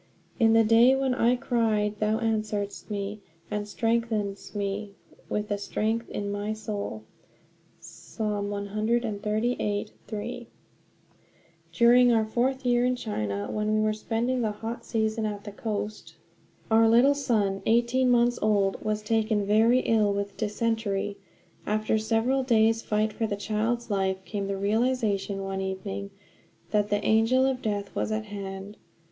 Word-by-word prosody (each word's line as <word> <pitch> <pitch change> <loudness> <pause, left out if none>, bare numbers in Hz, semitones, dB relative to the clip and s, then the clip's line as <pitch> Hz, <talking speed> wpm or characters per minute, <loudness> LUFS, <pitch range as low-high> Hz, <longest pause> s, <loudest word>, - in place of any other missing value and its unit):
"In 225 -1 +5
the 225 0 +6
day 230 +4 +6
when 265 -1 +1
I 245 -1 +3
cried 220 -5 0
thou 215 +1 +1
answeredst 215 -3 -2
me, 205 0 -4 0.3
and 210 0 -2
strengthenedst 220 -3 -1
me 200 0 -3 0.3
with 210 0 -1
strength 220 +3 -2
in 200 0 -3
my 205 +1 -2
soul" 205 - -5 0.8
(Psa. 220 - -9
138:3). 210 +2 -2 1.2
During 245 +1 +5
our 225 -2 +3
fourth 255 +4 -1
year 245 0 +3
in 250 0 +2
China, 105 - -3
when 215 0 0
we - - +2
were 215 0 +2
spending 235 +4 -1
the 220 - +1
hot 225 +3 -6
season 220 -1 -1
at 205 -1 -5
the 205 - -7
coast, 210 0 -5 0.6
our 225 0 +6
little 245 +5 +6
son, 215 -8 0
eighteen 240 +3 +3
months 240 0 +3
old, 200 -2 +1
was 215 -1 -1
taken 215 -1 +1
very 225 +5 +4
ill 215 -3 +2
with 200 0 -3
dysentery. 210 -2 -1 0.5
After 215 +1 +1
several 230 +5 +1
days' 225 -3 +3
fight 215 0 0
for 225 - -1
the 205 - -2
child's 220 +3 -2
life 190 -1 -1
came 200 -2 -3
the 195 0 -2
realization, 205 -2 0
one 195 0 -3
evening, 145 - -4 0.6
that 210 -1 +1
the 205 0 0
angel 225 +4 +4
of 265 -1 0
death 205 -2 -3
was - - -2
at 215 0 -2
hand. 200 0 -7
215 Hz, 140 wpm, -27 LUFS, 205-230 Hz, 1.2 s, the